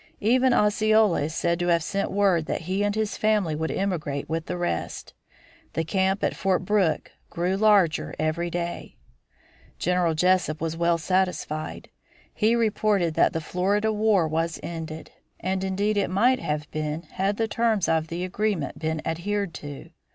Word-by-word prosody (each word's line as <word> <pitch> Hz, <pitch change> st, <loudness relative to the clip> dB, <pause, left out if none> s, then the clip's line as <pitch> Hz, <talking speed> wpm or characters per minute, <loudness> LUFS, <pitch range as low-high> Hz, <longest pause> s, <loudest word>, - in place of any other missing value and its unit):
Even 255 Hz, +4 st, +3 dB
Osceola 215 Hz, -4 st, +3 dB
is 155 Hz, +2 st, -3 dB
said 170 Hz, 0 st, 0 dB
to 175 Hz, -, -1 dB
have 170 Hz, -2 st, +3 dB
sent 195 Hz, +4 st, -2 dB
word 190 Hz, -5 st, +2 dB
that -, -, -2 dB
he 185 Hz, +4 st, -2 dB
and 205 Hz, 0 st, 0 dB
his 215 Hz, -1 st, -1 dB
family 210 Hz, -7 st, +1 dB
would 160 Hz, +1 st, -2 dB
emigrate 160 Hz, -8 st, -2 dB
with 160 Hz, 0 st, -3 dB
the 180 Hz, -, -3 dB
rest. 175 Hz, 0 st, -3 dB, 0.6 s
The 165 Hz, -, 0 dB
camp 190 Hz, +3 st, 0 dB
at -, -, +1 dB
Fort 185 Hz, -2 st, 0 dB
Brooke 195 Hz, -5 st, +1 dB, 0.2 s
grew 180 Hz, +3 st, -1 dB
larger 200 Hz, -5 st, +3 dB
every 155 Hz, +3 st, -1 dB
day. 175 Hz, 0 st, -5 dB, 0.8 s
General 180 Hz, -2 st, +1 dB
Jesup 180 Hz, -2 st, +2 dB
was 165 Hz, 0 st, -2 dB
well 170 Hz, 0 st, +2 dB
satisfied. 170 Hz, -3 st, -2 dB, 0.4 s
He 225 Hz, +2 st, +2 dB
reported 210 Hz, -6 st, +1 dB
that -, -, +3 dB
the 160 Hz, -, -2 dB
Florida 200 Hz, +6 st, 0 dB
war 210 Hz, -5 st, +3 dB
was 165 Hz, +1 st, -1 dB
ended. 160 Hz, -2 st, -6 dB, 0.3 s
And 190 Hz, +1 st, -2 dB
indeed 200 Hz, +2 st, 0 dB
it 200 Hz, -, +1 dB
might 240 Hz, +8 st, +3 dB
have 150 Hz, 0 st, -3 dB
been 155 Hz, +1 st, -3 dB
had 195 Hz, +3 st, -2 dB
the 225 Hz, -, 0 dB
terms 220 Hz, -3 st, +1 dB
of 160 Hz, 0 st, +1 dB
the 170 Hz, +2 st, -4 dB
agreement 185 Hz, -6 st, -2 dB
been 160 Hz, -1 st, -2 dB
adhered 190 Hz, +3 st, -2 dB
to. 145 Hz, -2 st, -9 dB
180 Hz, 165 wpm, -25 LUFS, 165-205 Hz, 0.8 s, Even